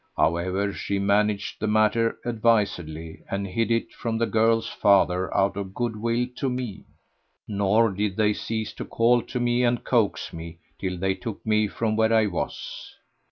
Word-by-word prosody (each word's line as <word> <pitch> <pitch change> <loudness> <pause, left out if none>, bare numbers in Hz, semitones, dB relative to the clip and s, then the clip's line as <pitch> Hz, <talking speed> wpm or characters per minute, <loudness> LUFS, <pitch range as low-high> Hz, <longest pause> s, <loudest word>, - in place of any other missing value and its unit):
However 95 +4 +1
she 100 - -2
managed 100 +1 +1
the 110 - -1
matter 110 +2 +2
advisedly 100 -9 0
and 100 0 -2
hid 110 +5 -1
it 115 0 0
from 115 -1 -3
the 115 - +2
girl's 115 0 +2
father 95 -2 +3
out 95 0 +2
of 95 -1 -6
good 120 -2 -1
will 115 +3 0
to 135 - 0
me; 125 -5 -5 0.6
nor 105 +2 +2
did 100 0 -2
they 105 -1 +3
cease 110 0 -4
to - - -6
call 120 +1 +3
to 125 - -5
me 120 0 +2
and 120 0 +1
coax 115 -5 0
me, 85 0 -8 0.2
till 90 -1 -3
they 95 +2 +1
took 110 +2 -7
me 110 -1 +2
from 110 +1 -1
where 110 0 +3
I 110 -1 +4
was. 95 -4 -5
105 Hz, 170 wpm, -25 LUFS, 100-115 Hz, 0.6 s, I